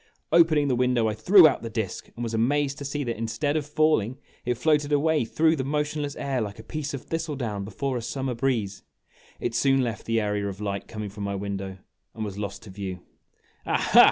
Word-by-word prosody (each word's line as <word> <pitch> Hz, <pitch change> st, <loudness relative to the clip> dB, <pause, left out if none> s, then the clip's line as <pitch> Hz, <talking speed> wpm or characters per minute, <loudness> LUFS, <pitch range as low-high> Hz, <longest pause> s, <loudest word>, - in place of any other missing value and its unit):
Opening 160 Hz, -3 st, +5 dB
the 130 Hz, -, +2 dB
window, 125 Hz, -2 st, +2 dB
I 110 Hz, -, 0 dB
threw 175 Hz, -, +7 dB
out 140 Hz, -, 0 dB
the 115 Hz, -, -5 dB
disk, 110 Hz, -4 st, -4 dB
and 120 Hz, -, -5 dB
was 115 Hz, -1 st, -3 dB
amazed 140 Hz, +5 st, +1 dB
to 140 Hz, -, -6 dB
see 145 Hz, +1 st, -2 dB
that, 120 Hz, -3 st, -3 dB
instead 145 Hz, +6 st, -1 dB
of 150 Hz, -2 st, -1 dB
falling, 150 Hz, -6 st, +2 dB, 0.3 s
it 125 Hz, 0 st, +1 dB
floated 150 Hz, +1 st, +2 dB
away 150 Hz, -2 st, +3 dB
through 160 Hz, +7 st, +3 dB
the 135 Hz, -, -2 dB
motionless 150 Hz, +1 st, -1 dB
air 135 Hz, -3 st, -1 dB
like 100 Hz, -2 st, -4 dB
a 110 Hz, -, -10 dB
piece 145 Hz, +2 st, -4 dB
of 135 Hz, -, -7 dB
thistle 165 Hz, -2 st, -3 dB
down 110 Hz, -7 st, -3 dB
before 125 Hz, +6 st, -2 dB
a -, -, -3 dB
summer 130 Hz, +2 st, -3 dB
breeze. 115 Hz, -6 st, -1 dB, 0.6 s
It 120 Hz, -, -2 dB
soon 135 Hz, +1 st, +3 dB
left 115 Hz, -2 st, -4 dB
the 115 Hz, 0 st, +2 dB
area 105 Hz, -1 st, -1 dB
of 100 Hz, -1 st, -6 dB
light 100 Hz, -1 st, -3 dB
coming 105 Hz, -2 st, -6 dB
from 105 Hz, 0 st, -7 dB
my 100 Hz, 0 st, -2 dB
window, 95 Hz, -1 st, -4 dB, 0.4 s
and 110 Hz, -1 st, -3 dB
was 100 Hz, -1 st, -6 dB
lost 100 Hz, -1 st, -5 dB
to 105 Hz, -, -10 dB
view. 95 Hz, -2 st, -5 dB, 0.7 s
"Aha!" -, -, +4 dB
125 Hz, 215 wpm, -26 LUFS, 105-145 Hz, 0.7 s, threw